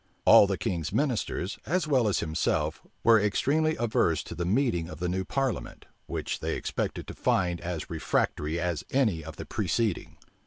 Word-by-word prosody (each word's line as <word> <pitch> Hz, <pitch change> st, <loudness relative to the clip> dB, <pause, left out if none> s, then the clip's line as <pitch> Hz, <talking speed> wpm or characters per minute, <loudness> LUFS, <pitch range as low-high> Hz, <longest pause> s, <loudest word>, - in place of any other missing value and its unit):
All 100 Hz, -, +8 dB
the 95 Hz, -1 st, -1 dB
king's 85 Hz, -4 st, -2 dB
ministers, 120 Hz, -8 st, -1 dB
as 175 Hz, +1 st, 0 dB
well 130 Hz, -6 st, +3 dB
as 100 Hz, -, +1 dB
himself, 80 Hz, -1 st, -1 dB, 0.2 s
were 115 Hz, -1 st, +6 dB
extremely 150 Hz, +10 st, +1 dB
averse 85 Hz, -9 st, +1 dB
to -, -, -8 dB
the 85 Hz, +1 st, -3 dB
meeting 95 Hz, -6 st, +1 dB
of -, -, -9 dB
the 90 Hz, -, -1 dB
new 95 Hz, +2 st, -1 dB
parliament, 135 Hz, +3 st, -3 dB, 0.2 s
which -, -, -3 dB
they -, -, -2 dB
expected -, -, -3 dB
to -, -, -8 dB
find 90 Hz, -2 st, 0 dB
as 85 Hz, -3 st, -4 dB
refractory 80 Hz, 0 st, -1 dB
as 85 Hz, -3 st, -2 dB
any 110 Hz, -, +1 dB
of 80 Hz, 0 st, -8 dB
the -, -, -7 dB
preceding. 110 Hz, -6 st, -1 dB
95 Hz, 170 wpm, -28 LUFS, 85-120 Hz, 0.2 s, All